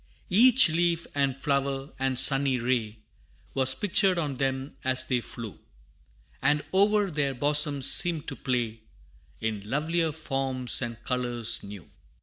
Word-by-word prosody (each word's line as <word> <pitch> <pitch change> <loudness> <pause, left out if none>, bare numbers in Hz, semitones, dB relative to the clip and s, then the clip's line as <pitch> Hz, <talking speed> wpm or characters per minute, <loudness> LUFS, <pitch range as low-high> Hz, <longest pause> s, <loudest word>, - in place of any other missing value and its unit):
Each 240 +3 +6
leaf, 170 +1 0
and 140 -2 -1
flower, 140 0 -2
and 135 -1 -1
sunny 135 0 +4
ray, 115 -3 -2 0.6
Was 130 -1 +3
pictured 195 +1 +1
on 145 -5 -3
them 135 +1 -3
as 130 0 +3
they 125 -2 -1
flew, 115 -3 -9 0.8
And 145 +2 +1
o'er 205 0 +2
their 140 -3 -2
bosoms 145 0 +2
seemed 170 -3 +4
to - - -7
play 120 -4 -3 0.6
In 110 -2 -3
lovelier 160 +4 -1
forms 135 -5 -1
and 120 -2 -6
colors 120 -2 -1
new. 100 -5 -11
135 Hz, 135 wpm, -26 LUFS, 125-155 Hz, 0.8 s, Each